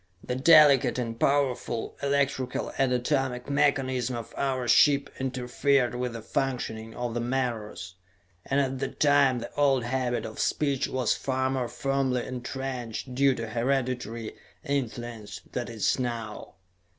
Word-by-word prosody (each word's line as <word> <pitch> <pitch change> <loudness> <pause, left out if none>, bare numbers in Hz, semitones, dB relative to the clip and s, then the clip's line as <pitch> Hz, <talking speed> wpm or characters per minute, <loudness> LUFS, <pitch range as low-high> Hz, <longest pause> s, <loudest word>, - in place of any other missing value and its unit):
The - - -3
delicate 145 -2 +6
and 115 -2 -3
powerful 130 -4 0
electrical 140 -2 0
and 135 -2 +3
atomic 125 0 -1
mechanism 130 -3 +1
of 115 -1 -7
our 130 -3 -1
ship 140 +4 +4
interfered 130 0 +1
with 125 -1 -3
the 115 -2 -7
functioning 115 -5 -3
of 120 -1 -3
the 120 - -1
menores, 120 -7 -3 0.5
and 140 - 0
at 135 -1 0
that - - -4
time 145 -3 +4
the 120 0 -7
old 135 -3 +2
habit 125 0 -1
of 110 - -8
speech 140 -3 0
was 130 -3 +1
far 130 0 -1
more 130 -2 -1
firmly 135 -1 -1
entrenched, 125 -1 -5
due 135 +1 +3
to 115 -1 -5
hereditary 120 -2 -2 0.3
influence, 120 -6 -4
than 125 -2 -3
it 115 - -8
is 110 +4 +1
now. 115 -4 -4
130 Hz, 140 wpm, -27 LUFS, 120-135 Hz, 0.5 s, delicate